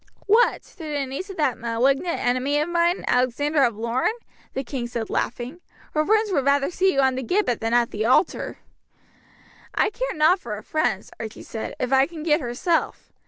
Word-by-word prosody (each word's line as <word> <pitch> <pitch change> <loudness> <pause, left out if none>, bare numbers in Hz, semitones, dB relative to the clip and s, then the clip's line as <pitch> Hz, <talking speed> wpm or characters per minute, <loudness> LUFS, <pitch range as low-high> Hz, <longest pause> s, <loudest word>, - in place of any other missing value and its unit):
"What! 445 +4 +3
to - - -21
the 295 -3 -2
niece 275 +10 -6
of 390 - -8
that 295 -6 +1
malignant 270 +9 +1
enemy 255 +4 +1
of 300 - 0
mine, 345 +1 +1
Alexander 275 +4 +2
of 235 -4 +1
Lorne?" 235 - 0 0.5
the 270 - -1
king 245 -1 -4
said 235 -2 -4
laughing. 250 +8 -3 0.3
"Her 305 - +2
friends 430 +3 +2
would 280 -7 +1
rather 280 +3 +2
see 375 +2 +2
you 275 - +3
on 265 -1 +3
the 260 - -3
gibbet 260 - 0
than 225 +1 +1
at 240 -1 +2
the 215 +2 -1
altar." 255 +9 +2 1.2
"I 420 - +2
care - - -3
nought 315 +5 +4
for 220 -10 -5
her 210 - -9
friends," 245 -11 -1
Archie 220 -1 -7
said, 225 - -6
"if 255 +1 -1
I 265 +1 +5
can 325 -3 -8
get 310 0 +2
herself. 265 +7 -1
275 Hz, 195 wpm, -24 LUFS, 240-335 Hz, 1.2 s, I